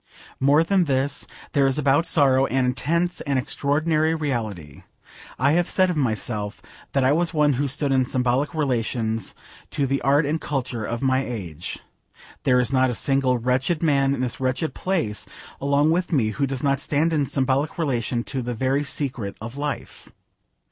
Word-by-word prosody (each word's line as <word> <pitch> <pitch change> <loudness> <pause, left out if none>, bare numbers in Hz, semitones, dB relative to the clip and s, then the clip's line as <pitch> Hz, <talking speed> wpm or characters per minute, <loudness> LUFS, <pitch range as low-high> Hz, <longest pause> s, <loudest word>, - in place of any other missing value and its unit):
More 145 +4 +4
than 185 +1 +2
this, 135 0 -1 0.2
there 140 -2 +3
is 135 +1 +1
about 145 +3 +2
sorrow 135 -4 +4
an 130 -1 +1
intense, 170 +8 0
an 140 -1 -1
extraordinary 155 +4 +1
reality. 110 - -4 0.6
I 135 +3 +3
have 175 +2 +2
said 185 -1 +2
of - - -3
myself 110 -5 -2 0.3
that 135 - +2
I 130 - +4
was 165 +2 0
one 150 -1 +4
who 140 +3 0
stood 140 +1 -1
in 130 -1 +3
symbolic 130 +4 0
relations 115 -5 -1 0.3
to 140 - -1
the 135 +1 -1
art 145 +3 +3
and 155 +3 -1
culture 125 -5 -3
of 115 +4 -3
my 130 0 +2
age. 90 - -6 0.7
There 125 -2 +4
is 125 +2 0
not 130 0 +3
a 120 - -2
single 135 -1 +1
wretched 130 +7 0
man 140 -3 +3
in 125 - -4
this 125 -2 -3
wretched 130 +5 -1
place 165 - -2 0.3
along 140 +2 +3
with 180 +2 0
me 120 -9 +2
who 140 +6 -1
does 135 0 -4
not 140 -1 +2
stand 155 +3 0
in 145 -3 +1
symbolic 135 +3 0
relation 120 -6 -1
to 135 0 -4
the 120 0 -4
very 135 +4 +1
secret 130 -8 -3
of 115 +3 -7
life. 145 0 -5
135 Hz, 175 wpm, -23 LUFS, 125-150 Hz, 0.7 s, More